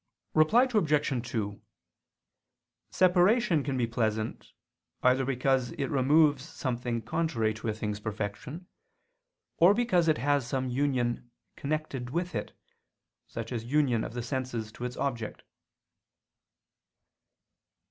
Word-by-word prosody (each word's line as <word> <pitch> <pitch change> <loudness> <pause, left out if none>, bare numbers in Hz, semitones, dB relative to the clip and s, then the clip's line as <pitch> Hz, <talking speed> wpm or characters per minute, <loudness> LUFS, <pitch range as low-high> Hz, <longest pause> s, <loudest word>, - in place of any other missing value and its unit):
Reply 160 +11 +5
Obj. 150 - +1
2: 105 -4 -3 1.3
Separation 185 0 +3
can 135 -1 -2
be 120 - +2
pleasant, 110 -1 -2 0.5
either 130 +1 +4
because 130 -1 0
it 140 -3 -3
removes 145 +1 +4
something 120 -6 -3
contrary 120 -6 0
to 110 +1 -7
a 110 - 0
thing's 105 -1 -3
perfection, 110 - -5 0.9
or 180 +5 +6
because 210 -8 +2
it 155 - +3
has 140 0 +1
some 130 0 -1
union 125 -2 0 0.3
connected 140 -4 -3
with 175 +5 -2
it, - - -5 0.7
such 115 0 -6
as 115 -2 -3
union 130 -4 +2
of - - -6
the 120 - -3
sense 120 -3 -3
to 120 - -6
its 125 0 -5
object. 120 -6 -3
130 Hz, 115 wpm, -29 LUFS, 115-155 Hz, 1.3 s, or